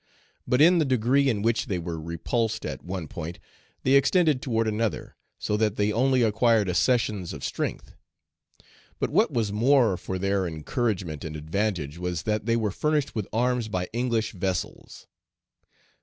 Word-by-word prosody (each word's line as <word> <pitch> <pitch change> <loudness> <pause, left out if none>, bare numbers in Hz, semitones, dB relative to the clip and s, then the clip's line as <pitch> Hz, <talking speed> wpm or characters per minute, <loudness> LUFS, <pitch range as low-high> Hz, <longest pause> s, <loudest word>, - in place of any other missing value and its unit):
But 125 +2 +2
in 175 +3 +6
the - - +4
degree 130 +1 +2
in 105 -5 -1
which 115 +2 +1
they 95 -5 -1
were 85 -2 -5
repulsed 110 +8 -2
at - - -5
one 90 -3 -5
point, 85 +3 -6 0.5
they 130 - +1
extended 140 +1 +4
toward 115 -3 0
another, 110 -4 -2 0.2
so 105 - -1
that 105 -1 +1
they 105 +1 +1
only 130 +2 +3
acquired 110 -1 +3
accessions 100 -1 +1
of - - -8
strength. - - -4 1.0
But - - -2
what - - +3
was 110 -4 0
more 120 -3 +3
for 95 - -4
their 100 0 0
encouragement 85 - -2
and 80 -1 -6
advantage 80 -1 -2
was 90 -1 -3
that 105 0 -1
they 115 - +3
were 110 -3 0
furnished 150 +5 0
with 110 -4 -3
arms 120 +1 0
by 90 -4 -3
English 115 -2 0
vessels. 95 -2 -4
110 Hz, 160 wpm, -26 LUFS, 90-120 Hz, 1.0 s, in